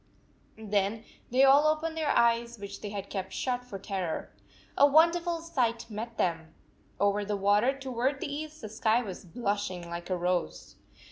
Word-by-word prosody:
Then 210 Hz, 0 st, -1 dB, 0.3 s
they 255 Hz, +3 st, +4 dB
all 280 Hz, +3 st, +7 dB
opened 315 Hz, +1 st, 0 dB
their 315 Hz, -2 st, -1 dB
eyes, 235 Hz, 0 st, +2 dB
which 200 Hz, -1 st, -8 dB
they 205 Hz, -, -5 dB
had 200 Hz, -1 st, -5 dB
kept 190 Hz, -1 st, -4 dB
shut 250 Hz, -1 st, -1 dB
for 240 Hz, -6 st, -7 dB
terror. 190 Hz, -4 st, -4 dB, 0.4 s
A 285 Hz, -, +7 dB
wonderful 335 Hz, +3 st, +3 dB
sight 245 Hz, -9 st, -1 dB
met 225 Hz, +2 st, -6 dB
them! 165 Hz, -2 st, -1 dB, 0.4 s
Over 205 Hz, 0 st, +2 dB
the 205 Hz, 0 st, -2 dB
water 205 Hz, +7 st, +3 dB
toward 265 Hz, +1 st, -1 dB
the -, -, -3 dB
east 310 Hz, +1 st, -7 dB
the 215 Hz, -, -6 dB
sky 220 Hz, +2 st, +1 dB
was 190 Hz, -4 st, -7 dB
blushing 200 Hz, -3 st, -3 dB
like 170 Hz, +1 st, -6 dB
a 185 Hz, -, 0 dB
rose. 175 Hz, -, -2 dB
220 Hz, 165 wpm, -29 LUFS, 195-270 Hz, 0.4 s, all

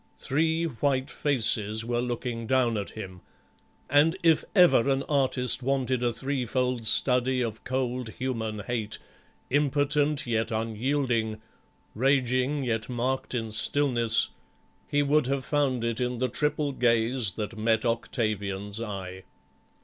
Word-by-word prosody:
Three 160 Hz, +4 st, 0 dB
white 135 Hz, -1 st, -1 dB
set -, -, -14 dB
faces 110 Hz, -5 st, +1 dB
were 120 Hz, 0 st, -1 dB
looking 120 Hz, -1 st, -4 dB
down 125 Hz, -2 st, +2 dB
at 100 Hz, -2 st, -3 dB
him, 95 Hz, -4 st, -9 dB, 0.7 s
and 150 Hz, +6 st, +3 dB
if 165 Hz, -2 st, +4 dB
ever 175 Hz, -, +5 dB
an 135 Hz, 0 st, +1 dB
artist 130 Hz, -3 st, +2 dB
wanted 130 Hz, -1 st, 0 dB
a 120 Hz, -1 st, +1 dB
threefold 125 Hz, -1 st, -1 dB
study 125 Hz, +1 st, +3 dB
of 110 Hz, -2 st, -5 dB
cold 125 Hz, -2 st, -2 dB
human 110 Hz, -5 st, -3 dB
hate, 110 Hz, -2 st, -3 dB, 0.5 s
impotent 145 Hz, +1 st, +1 dB
yet 115 Hz, -2 st, -1 dB
unyielding, 115 Hz, 0 st, -1 dB, 0.5 s
raging 130 Hz, +2 st, +1 dB
yet 115 Hz, -2 st, -2 dB
masked 125 Hz, +2 st, -2 dB
in 115 Hz, -2 st, -3 dB
stillness, 120 Hz, -1 st, +2 dB, 0.6 s
he 145 Hz, 0 st, +1 dB
would 145 Hz, -1 st, +2 dB
have 135 Hz, -1 st, -1 dB
found 135 Hz, -5 st, 0 dB
it 115 Hz, -1 st, -1 dB
in 125 Hz, -1 st, -1 dB
the 130 Hz, +1 st, 0 dB
triple 150 Hz, +2 st, 0 dB
gaze 115 Hz, -3 st, +1 dB
that 105 Hz, +4 st, -5 dB
met 110 Hz, +1 st, +1 dB
Octavian's 105 Hz, -3 st, -2 dB
eye. 95 Hz, -4 st, -6 dB
125 Hz, 130 wpm, -27 LUFS, 115-135 Hz, 0.7 s, ever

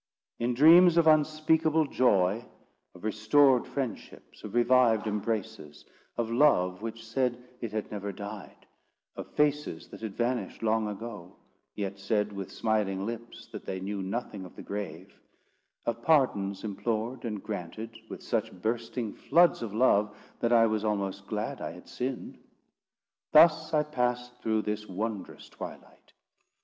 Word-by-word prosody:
In 120 Hz, +1 st, 0 dB
dreams 170 Hz, +5 st, +7 dB
of 170 Hz, -, +5 dB
unspeakable 155 Hz, +1 st, +3 dB
joy—of 100 Hz, -6 st, -1 dB
restored 120 Hz, +5 st, +4 dB
friendships; 135 Hz, -4 st, -6 dB
of 105 Hz, +1 st, -7 dB
revived 120 Hz, -3 st, +4 dB
embraces; 105 Hz, -7 st, -4 dB, 0.3 s
of 115 Hz, -1 st, -1 dB
love 100 Hz, -9 st, +3 dB
which 115 Hz, 0 st, -6 dB
said 125 Hz, +1 st, 0 dB, 0.2 s
it 115 Hz, -3 st, -4 dB
had 110 Hz, -1 st, -4 dB
never 100 Hz, -1 st, -4 dB
died; 100 Hz, 0 st, -9 dB, 0.5 s
of -, -, -8 dB
faces 150 Hz, -, 0 dB
that -, -, -11 dB
had 110 Hz, -3 st, -5 dB
vanished 120 Hz, -1 st, -2 dB
long 110 Hz, 0 st, +2 dB
ago, 105 Hz, -3 st, -7 dB, 0.4 s
yet 100 Hz, -1 st, -4 dB
said 105 Hz, +1 st, 0 dB
with 100 Hz, -1 st, -6 dB
smiling 100 Hz, -3 st, -1 dB
lips 115 Hz, +1 st, -7 dB
that -, -, -7 dB
they 95 Hz, -, -4 dB
knew 100 Hz, +1 st, -4 dB
nothing 100 Hz, 0 st, -4 dB
of 90 Hz, -, -12 dB
the -, -, -9 dB
grave; 95 Hz, -3 st, -6 dB, 0.7 s
of 115 Hz, 0 st, -2 dB
pardons 100 Hz, -10 st, +2 dB
implored, 115 Hz, +3 st, -3 dB
and 105 Hz, -4 st, -4 dB
granted 110 Hz, +2 st, -6 dB
with -, -, -8 dB
such -, -, -1 dB
bursting 115 Hz, +1 st, -2 dB
floods 170 Hz, +4 st, +3 dB
of 115 Hz, -3 st, -4 dB
love, 105 Hz, -2 st, +2 dB, 0.2 s
that 115 Hz, -, 0 dB
I 115 Hz, -1 st, +6 dB
was 110 Hz, -1 st, 0 dB
almost 100 Hz, -3 st, -2 dB
glad -, -, -3 dB
I -, -, -4 dB
had -, -, -14 dB
sinned—thus 155 Hz, +5 st, 0 dB
I 150 Hz, -1 st, +3 dB
passed 125 Hz, -4 st, -2 dB
through 110 Hz, -1 st, 0 dB
this 105 Hz, 0 st, -3 dB
wondrous 105 Hz, +1 st, -5 dB
twilight. -, -, -11 dB
110 Hz, 140 wpm, -29 LUFS, 100-125 Hz, 0.7 s, dreams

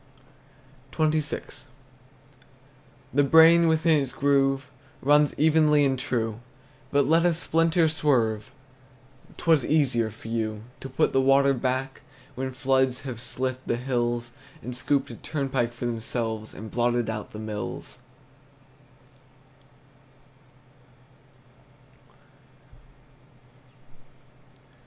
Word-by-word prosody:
XXVI. 155 Hz, -3 st, -1 dB, 1.5 s
The 145 Hz, +2 st, +4 dB
brain 165 Hz, +3 st, +6 dB
within 160 Hz, -1 st, +3 dB
its 130 Hz, -2 st, -5 dB
groove 135 Hz, -1 st, +1 dB, 0.3 s
Runs 145 Hz, +1 st, +3 dB
evenly 150 Hz, -2 st, +4 dB
and 135 Hz, -2 st, 0 dB
true; 115 Hz, -3 st, -2 dB, 0.5 s
But 140 Hz, -1 st, +3 dB
let 165 Hz, +2 st, +3 dB
a 175 Hz, -2 st, +2 dB
splinter 165 Hz, +1 st, +2 dB
swerve, 130 Hz, -7 st, 0 dB, 0.9 s
'T -, -, -9 dB
were 165 Hz, -1 st, +6 dB
easier 125 Hz, -7 st, +1 dB
for 110 Hz, +1 st, -13 dB
you 110 Hz, -2 st, -3 dB, 0.2 s
To 135 Hz, -, -8 dB
put 130 Hz, -, 0 dB
the 135 Hz, -, +3 dB
water 135 Hz, +1 st, +4 dB
back 130 Hz, +1 st, -3 dB, 0.3 s
When 130 Hz, +1 st, -4 dB
floods 130 Hz, -1 st, 0 dB
have 125 Hz, -4 st, -7 dB
slit 130 Hz, +1 st, -3 dB
the -, -, +1 dB
hills, 120 Hz, -1 st, -2 dB, 0.3 s
And 125 Hz, 0 st, -6 dB
scooped 135 Hz, +2 st, -1 dB
a -, -, -8 dB
turnpike 135 Hz, -5 st, -2 dB
for 120 Hz, +1 st, -7 dB
themselves, 115 Hz, -2 st, -4 dB
And 110 Hz, 0 st, -9 dB
blotted 120 Hz, -1 st, 0 dB
out 110 Hz, -1 st, -5 dB
the -, -, -10 dB
mills! 110 Hz, -1 st, -6 dB
130 Hz, 100 wpm, -25 LUFS, 120-145 Hz, 1.5 s, brain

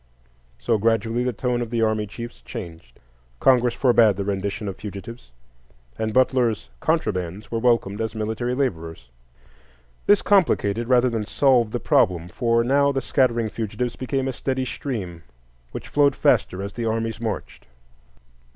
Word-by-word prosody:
So 115 Hz, -3 st, 0 dB
gradually 115 Hz, +2 st, +1 dB
the 125 Hz, -, 0 dB
tone 120 Hz, +2 st, -1 dB
of 120 Hz, -, -3 dB
the 115 Hz, -1 st, 0 dB
army 110 Hz, -1 st, 0 dB
chiefs 120 Hz, +3 st, -9 dB
changed; 80 Hz, -9 st, -9 dB, 0.4 s
Congress 125 Hz, -2 st, +3 dB
forbade 120 Hz, -5 st, +4 dB
the 100 Hz, +1 st, -3 dB
rendition 100 Hz, +1 st, -3 dB
of 95 Hz, -, -5 dB
fugitives, 105 Hz, -, -9 dB, 0.7 s
and 110 Hz, 0 st, -2 dB
Butler's 125 Hz, -, +1 dB
"contrabands" 90 Hz, +3 st, -2 dB
were 115 Hz, -, -1 dB
welcomed 115 Hz, -4 st, +1 dB
as 110 Hz, 0 st, -3 dB
military 110 Hz, +3 st, -2 dB
laborers. 85 Hz, -, -3 dB, 1.0 s
This 205 Hz, -, +5 dB
complicated 120 Hz, -, +2 dB
rather 125 Hz, 0 st, +3 dB
than 115 Hz, -2 st, -1 dB
solved 125 Hz, -5 st, +3 dB
the 120 Hz, -, -2 dB
problem, 95 Hz, -, +2 dB
for 115 Hz, +4 st, +1 dB
now 140 Hz, +3 st, +3 dB
the 135 Hz, -, -1 dB
scattering 120 Hz, -4 st, +1 dB
fugitives 115 Hz, +3 st, -3 dB
became 135 Hz, +1 st, -2 dB
a 135 Hz, -, -2 dB
steady 130 Hz, +1 st, -2 dB
stream, 100 Hz, -, -5 dB, 0.5 s
which -, -, -7 dB
flowed 140 Hz, -2 st, +3 dB
faster 95 Hz, +1 st, +1 dB
as 100 Hz, 0 st, -6 dB
the 120 Hz, -, -4 dB
armies 115 Hz, 0 st, -2 dB
marched. 110 Hz, -3 st, -5 dB
115 Hz, 150 wpm, -23 LUFS, 100-125 Hz, 1.0 s, This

